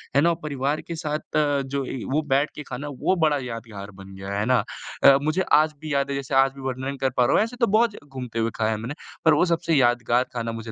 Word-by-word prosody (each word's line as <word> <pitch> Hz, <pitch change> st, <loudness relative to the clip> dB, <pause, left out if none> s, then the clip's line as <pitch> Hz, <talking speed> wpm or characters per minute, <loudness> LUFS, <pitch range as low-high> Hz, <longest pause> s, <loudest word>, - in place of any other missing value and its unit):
है 140 Hz, -, +6 dB
ना? 170 Hz, +1 st, +4 dB
परिवार 145 Hz, 0 st, -1 dB
के 170 Hz, -, -6 dB
साथ 155 Hz, -1 st, -3 dB, 0.3 s
जो 135 Hz, 0 st, -3 dB
ए 125 Hz, -, -5 dB
वो 155 Hz, +3 st, +2 dB
बैठ 140 Hz, +3 st, +2 dB
के 150 Hz, -, -6 dB
खाना, 145 Hz, +1 st, -6 dB
वो 145 Hz, +7 st, 0 dB
बड़ा 150 Hz, -2 st, +2 dB
यादगार 115 Hz, -4 st, -7 dB
बन 95 Hz, 0 st, -12 dB
गया। 100 Hz, +1 st, -5 dB
है 105 Hz, -, 0 dB
ना? 125 Hz, -4 st, +3 dB, 0.4 s
अ, 135 Hz, 0 st, +8 dB
मुझे 155 Hz, +5 st, +1 dB, 0.2 s
आज 155 Hz, -1 st, -1 dB
भी 155 Hz, -2 st, -4 dB
याद 140 Hz, 0 st, +1 dB
है -, -, -1 dB
जैसे 140 Hz, 0 st, -3 dB
आज 135 Hz, 0 st, +5 dB
भी 135 Hz, -, -10 dB
वर्णन 130 Hz, +1 st, -4 dB
कर 135 Hz, -, +2 dB
पा 125 Hz, -, +5 dB
रहा 130 Hz, -, +3 dB
हूँ। -, -, +5 dB
ऐसे 235 Hz, +2 st, -5 dB
तो 235 Hz, -, +5 dB
बहुत 230 Hz, -2 st, +2 dB
घूमते 125 Hz, -4 st, -6 dB
हुए 115 Hz, 0 st, 0 dB
खाया 110 Hz, -1 st, 0 dB
है 110 Hz, -, -1 dB
हम 110 Hz, -, -7 dB
ने 145 Hz, -, -5 dB, 0.3 s
पर 160 Hz, -, +7 dB
वो 160 Hz, -, +4 dB
सबसे 165 Hz, 0 st, 0 dB
यादगार 120 Hz, -2 st, +3 dB
खाना 115 Hz, -1 st, -3 dB
मुझे 115 Hz, 0 st, -7 dB
135 Hz, 265 wpm, -24 LUFS, 120-150 Hz, 0.4 s, अ